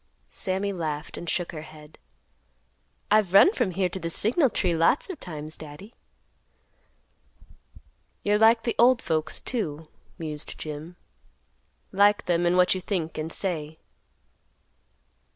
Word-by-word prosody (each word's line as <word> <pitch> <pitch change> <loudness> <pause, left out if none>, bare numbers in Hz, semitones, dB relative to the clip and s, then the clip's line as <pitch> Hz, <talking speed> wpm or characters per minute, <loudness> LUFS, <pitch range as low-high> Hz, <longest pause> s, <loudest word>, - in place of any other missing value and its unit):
Sammy 195 +2 -3
laughed, 155 -4 -4
and 170 - -6
shook 175 -2 -2
her 155 - -7
head; 155 -1 -14 1.1
"I've 210 -4 +3
run 200 - +7
from 245 - 0
here 185 +1 0
to 190 - -5
the 170 - -4
signal 250 - +3
tree, 180 -5 0
lots 170 - +2
of 330 - -9
times, 155 -2 -7
Daddy." 155 +9 -11 2.3
"You're 205 0 +2
like 225 +1 +5
the 235 - 0
old 245 0 +6
folks, 155 -1 -1
too," 160 - -4 0.3
mused 155 -2 -5
Jim; 155 +3 -7 1.0
"like 205 +1 +3
them 175 0 +1
in 175 +1 +2
what 180 0 +4
you 185 - -4
think 170 -5 -3
and 155 +1 -3
say." 160 -5 -2
175 Hz, 135 wpm, -26 LUFS, 155-205 Hz, 2.3 s, run